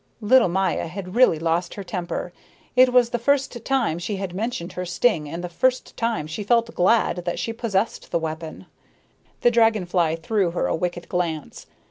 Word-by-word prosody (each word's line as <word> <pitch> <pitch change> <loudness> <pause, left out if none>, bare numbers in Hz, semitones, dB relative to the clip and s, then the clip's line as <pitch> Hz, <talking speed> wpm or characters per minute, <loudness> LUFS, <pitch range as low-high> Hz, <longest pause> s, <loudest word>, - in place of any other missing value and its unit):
Little 235 +1 +5
Maya 185 -1 0
had 180 +2 -7
really 245 -9 +5
lost 165 +2 -1
her 200 - -6
temper. 175 -2 -4 0.4
It 255 0 +6
was 245 -1 +4
the 240 - -1
first 260 -2 0
time 265 -12 0
she 175 +4 -3
had 190 -2 -5
mentioned 200 -3 -4
her 180 - -4
sting 175 -3 +1
and 170 +3 -5
the - - -2
first 255 +9 0
time 230 -10 -1
she 160 +7 -5
felt 235 +2 +2
glad 190 +3 +2
that 175 -1 -3
she 230 - -3
possessed 225 -2 -2
the - - +1
weapon. 160 0 -5 0.8
The 240 - +4
dragon 225 -4 +3
fly 170 -3 +1
threw 190 +3 0
her - - +1
a - - 0
wicked 175 +1 -3
glance. 170 -4 -3
190 Hz, 185 wpm, -23 LUFS, 170-230 Hz, 0.8 s, It